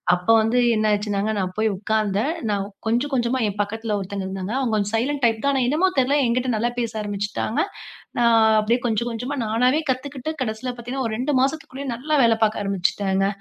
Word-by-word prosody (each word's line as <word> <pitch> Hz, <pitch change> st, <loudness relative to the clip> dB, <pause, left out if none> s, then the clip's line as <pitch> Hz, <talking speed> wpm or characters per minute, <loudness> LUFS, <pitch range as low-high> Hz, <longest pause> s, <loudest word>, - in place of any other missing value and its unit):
அப்ப 180 Hz, +2 st, -7 dB
வந்து 225 Hz, +3 st, +1 dB, 0.2 s
என்ன 215 Hz, 0 st, +1 dB
ஆயிடுச்சுன்னாங்க, 205 Hz, 0 st, 0 dB
நான் 185 Hz, -1 st, -2 dB
போய் 220 Hz, 0 st, +2 dB
உட்கார்ந்தேன். 215 Hz, +3 st, 0 dB, 0.2 s
நான் 200 Hz, -1 st, 0 dB, 0.2 s
கொஞ்சம், 245 Hz, +6 st, 0 dB
கொஞ்சமா 250 Hz, 0 st, +1 dB
என் 205 Hz, -, -4 dB
பக்கத்துல 220 Hz, +1 st, -2 dB
ஒருத்தங்க 195 Hz, 0 st, -4 dB
இருந்தாங்க. 190 Hz, +2 st, -4 dB
அவுங்க 240 Hz, -5 st, -1 dB
கொஞ்சம் 205 Hz, 0 st, -1 dB
சைலன்ட் 270 Hz, +4 st, -1 dB
டைப்தான் 230 Hz, +4 st, +2 dB
ஆனா 265 Hz, -, +1 dB
என்னமோ 315 Hz, +8 st, +3 dB
தெரியல, 265 Hz, +3 st, +3 dB
என்கிட்ட 250 Hz, +2 st, 0 dB
நல்லா 230 Hz, +3 st, 0 dB
பேச 235 Hz, -2 st, -2 dB
ஆரம்பிச்சுட்டாங்க. 205 Hz, +2 st, -2 dB, 0.6 s
நான் 225 Hz, -2 st, +5 dB
அப்பிடியே 230 Hz, +4 st, +1 dB
கொஞ்சம், 235 Hz, +1 st, 0 dB
கொஞ்சமா 245 Hz, +5 st, -4 dB
நானாவே 250 Hz, +7 st, +2 dB
கத்துக்கிட்டு 265 Hz, +2 st, -2 dB
கடைசில 235 Hz, +1 st, -2 dB
பார்த்தீங்கன்னா, 245 Hz, +2 st, -4 dB
ஒரு 220 Hz, -, -4 dB
2 270 Hz, +4 st, -1 dB
மாசத்துக்குள்ளயே 275 Hz, -1 st, -2 dB
நல்லா 290 Hz, +6 st, -1 dB
வேலை 225 Hz, -1 st, +4 dB
பார்க்க 215 Hz, -1 st, +1 dB
ஆரம்பிச்சுட்டேங்க. 195 Hz, 0 st, 0 dB
225 Hz, 180 wpm, -22 LUFS, 210-255 Hz, 0.6 s, நான்